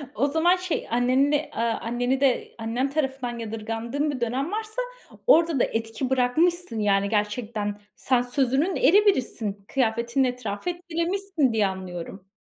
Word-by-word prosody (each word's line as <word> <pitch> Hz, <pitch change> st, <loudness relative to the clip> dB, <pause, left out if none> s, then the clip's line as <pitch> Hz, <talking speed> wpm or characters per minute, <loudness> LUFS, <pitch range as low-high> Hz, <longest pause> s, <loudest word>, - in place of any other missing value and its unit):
O 275 Hz, +6 st, +2 dB
zaman 325 Hz, +5 st, +3 dB
şey, 365 Hz, -2 st, -3 dB
anneni 255 Hz, +4 st, +2 dB
de, 300 Hz, +1 st, 0 dB
aaa, 230 Hz, 0 st, 0 dB
anneni 245 Hz, +3 st, -1 dB
de 265 Hz, -3 st, +1 dB
Annen 235 Hz, +4 st, -1 dB
tarafından 265 Hz, -4 st, -2 dB
yadırgandığın 225 Hz, +6 st, -3 dB
bir 255 Hz, -4 st, -6 dB
dönem 260 Hz, +8 st, -1 dB
varsa 435 Hz, +3 st, -3 dB, 0.5 s
orada 330 Hz, -, +5 dB
da -, -, +4 dB
etki 225 Hz, +3 st, -2 dB
bırakmışsın 265 Hz, +2 st, +1 dB
yani 200 Hz, -1 st, +2 dB
gerçekten. 210 Hz, -1 st, -2 dB, 0.2 s
Sen 255 Hz, -2 st, +1 dB
sözünün 265 Hz, +7 st, +1 dB
eri 410 Hz, +5 st, +5 dB
birisin, 220 Hz, -, 0 dB
kıyafetinle 235 Hz, +1 st, +1 dB
etrafı 250 Hz, -, -4 dB
etkilemişsin 345 Hz, -3 st, -1 dB
diye 215 Hz, -2 st, +3 dB
anlıyorum. 185 Hz, 0 st, -7 dB
250 Hz, 140 wpm, -25 LUFS, 225-310 Hz, 0.5 s, orada